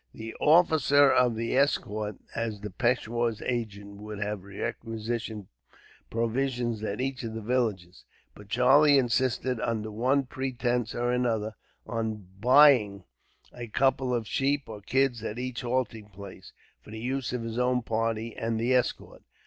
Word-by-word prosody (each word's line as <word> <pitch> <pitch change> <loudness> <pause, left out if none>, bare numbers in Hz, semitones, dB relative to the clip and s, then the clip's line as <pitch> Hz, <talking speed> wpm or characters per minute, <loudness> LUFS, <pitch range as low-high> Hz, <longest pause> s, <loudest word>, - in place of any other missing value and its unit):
The 110 0 -7
officer 150 -4 +5
of 125 -3 +3
the 115 +2 -2
escort, 110 -6 0 0.2
as 115 -3 -3
the 105 -1 -6
peishwar's 120 0 0
agent, 100 -4 -4
would 105 0 -8
have 105 -1 -3
requisitioned 110 +1 -5 0.6
provisions 120 0 -1
at 105 0 -3
each 130 0 -2
of 115 -2 -5
the 115 - -4
villages; 105 -7 -1 0.3
but 105 -1 -15
Charlie 140 +5 +5
insisted, 130 0 +1
under 110 -1 -2
one 130 +6 +1
pretence 125 -3 -2
or 120 0 0
another, 115 -3 0 0.3
on 110 -3 -3
buying 125 -5 +5 0.5
a 120 -1 -7
couple 130 +2 +1
of 115 -3 -1
sheep 140 +1 0
or 105 -2 -8
kids 125 +1 +1
at 110 0 -4
each 125 -1 -4
halting 120 -4 -2
place, 100 -1 -11 0.3
for - - -17
the 110 +1 -7
use 130 +2 -2
of 125 -2 -3
his 115 +1 -4
own 125 -1 +1
party 115 0 -2
and 115 -1 -2
the 120 +3 +1
escort. 125 -1 -1
115 Hz, 150 wpm, -28 LUFS, 110-125 Hz, 0.6 s, officer